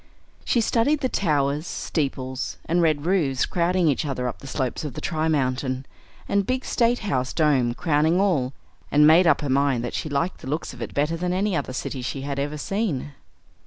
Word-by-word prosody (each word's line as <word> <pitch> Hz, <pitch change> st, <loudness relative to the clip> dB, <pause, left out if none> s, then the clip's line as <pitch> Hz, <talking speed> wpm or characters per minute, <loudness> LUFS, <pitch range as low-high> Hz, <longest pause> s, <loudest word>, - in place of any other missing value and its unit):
She 235 Hz, -, +2 dB
studied 250 Hz, +7 st, +2 dB
the 260 Hz, -, +1 dB
towers, 150 Hz, -, 0 dB
steeples, 130 Hz, -4 st, -3 dB
and 175 Hz, +1 st, +2 dB
red 155 Hz, -3 st, +1 dB
roofs 160 Hz, -8 st, +2 dB
crowding 175 Hz, 0 st, +1 dB
each 145 Hz, +2 st, +1 dB
other 130 Hz, -4 st, -2 dB
up 120 Hz, -, -5 dB
the 140 Hz, -, -10 dB
slopes 130 Hz, 0 st, -2 dB
of 145 Hz, -5 st, -5 dB
the -, -, -4 dB
Tri 160 Hz, -1 st, -1 dB
Mountain, 130 Hz, -3 st, 0 dB, 0.4 s
and 200 Hz, -, +2 dB
the -, -, -7 dB
big 255 Hz, +3 st, -1 dB
State 240 Hz, 0 st, +2 dB
House 130 Hz, -9 st, -1 dB
dome 135 Hz, -7 st, +2 dB
crowning 160 Hz, +3 st, +2 dB
all, 160 Hz, -11 st, +2 dB, 0.4 s
and 150 Hz, +1 st, +5 dB
made 165 Hz, +3 st, +7 dB
up -, -, +4 dB
her 145 Hz, -, -2 dB
mind 135 Hz, -2 st, +2 dB
that 120 Hz, -, -4 dB
she 155 Hz, -, -3 dB
liked 150 Hz, +6 st, -1 dB
the 130 Hz, -, -7 dB
looks 155 Hz, 0 st, -3 dB
of 125 Hz, -, -11 dB
it 115 Hz, -, -6 dB
better 150 Hz, +3 st, +1 dB
than 180 Hz, +1 st, -1 dB
any 195 Hz, +1 st, 0 dB
other 140 Hz, -2 st, -2 dB
city 130 Hz, 0 st, -4 dB
she 130 Hz, +2 st, -4 dB
had 140 Hz, 0 st, -3 dB
ever 145 Hz, +2 st, -2 dB
seen. 160 Hz, -, -2 dB
150 Hz, 205 wpm, -24 LUFS, 135-175 Hz, 0.4 s, made